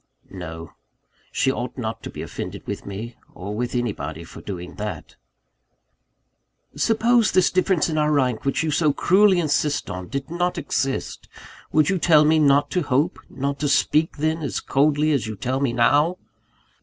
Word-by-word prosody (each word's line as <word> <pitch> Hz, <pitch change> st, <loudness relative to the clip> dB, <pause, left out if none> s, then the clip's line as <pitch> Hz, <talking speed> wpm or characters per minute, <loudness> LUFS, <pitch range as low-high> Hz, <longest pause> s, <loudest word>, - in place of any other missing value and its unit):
No: 80 Hz, -3 st, -8 dB, 0.6 s
she 135 Hz, -, +1 dB
ought 125 Hz, -1 st, -5 dB
not 115 Hz, -3 st, -4 dB
to -, -, -7 dB
be -, -, -7 dB
offended -, -, -7 dB
with -, -, -6 dB
me, 110 Hz, +4 st, -7 dB, 0.2 s
or 100 Hz, +4 st, -6 dB
with 120 Hz, +3 st, -3 dB
anybody, 100 Hz, -9 st, -3 dB
for 80 Hz, -, -11 dB
doing 90 Hz, -3 st, -7 dB
that. 105 Hz, 0 st, -6 dB, 1.6 s
"Suppose 230 Hz, 0 st, +3 dB
this 185 Hz, -1 st, +3 dB
difference 185 Hz, -2 st, +2 dB
in 155 Hz, -2 st, -1 dB
rank, 140 Hz, -6 st, +1 dB
which 135 Hz, +3 st, 0 dB
you 160 Hz, -, 0 dB
so 150 Hz, -1 st, +2 dB
cruelly 190 Hz, +3 st, +4 dB
insist 150 Hz, -2 st, 0 dB
on, 90 Hz, 0 st, -6 dB
did 140 Hz, -, -5 dB
not 175 Hz, +1 st, -1 dB
exist, 135 Hz, -3 st, -3 dB, 0.4 s
would 155 Hz, -1 st, +3 dB
you 190 Hz, -, 0 dB
tell 155 Hz, -2 st, +5 dB
me 155 Hz, +1 st, +4 dB
not 145 Hz, 0 st, +3 dB
to 180 Hz, -, +1 dB
hope, 145 Hz, 0 st, 0 dB
not 140 Hz, +1 st, -3 dB
to 150 Hz, -, 0 dB
speak 150 Hz, +4 st, +2 dB
then, 155 Hz, +2 st, 0 dB
as 145 Hz, -, -2 dB
coldly 150 Hz, +2 st, +2 dB
as 135 Hz, -6 st, 0 dB
you 110 Hz, -, -5 dB
tell 130 Hz, +6 st, -2 dB
me 135 Hz, -3 st, +1 dB
now?" 145 Hz, +9 st, +3 dB
140 Hz, 170 wpm, -23 LUFS, 120-160 Hz, 1.6 s, tell